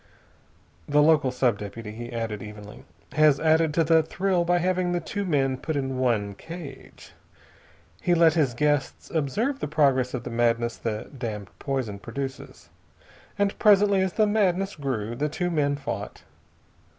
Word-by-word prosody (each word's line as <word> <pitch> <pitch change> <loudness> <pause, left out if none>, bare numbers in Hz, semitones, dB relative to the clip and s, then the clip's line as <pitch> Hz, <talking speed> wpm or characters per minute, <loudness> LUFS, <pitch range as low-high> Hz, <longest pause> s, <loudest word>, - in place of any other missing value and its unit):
"The 145 - +3
local 150 -4 +4
sub 125 -4 +1
deputy," 105 +1 -7
he 120 +2 -8
added 115 -3 -4
evenly, 105 -1 -10 0.3
"has 150 -1 +4
added 160 0 +3
to 165 - +4
the 160 +1 +4
thrill 180 +2 0
by 175 +1 +2
having 180 0 0
the 175 - +1
two 200 +5 -4
men 135 -6 +1
put 160 +4 -4
in 135 -2 -2
one 110 -6 +1
cage. 160 - -10 0.9
He 175 - +2
let 165 -1 +5
his 145 -7 +1
guests 145 +1 -1
observe 210 - -1
the - - -3
progress 135 -4 +2
of 120 - -5
the 125 - -6
madness 115 0 +1
the 110 -2 -4
damned 105 -6 -5
poison 130 -8 -3
produces. 135 +5 -7 0.7
And 200 -1 +1
presently, 205 -2 +5
as 190 -2 0
the 215 - +3
madness 195 -2 +1
grew, 120 -6 -3
the 150 +4 -1
two 175 +3 -2
men 145 -3 +1
fought. 135 -8 -6
140 Hz, 160 wpm, -25 LUFS, 120-170 Hz, 0.9 s, let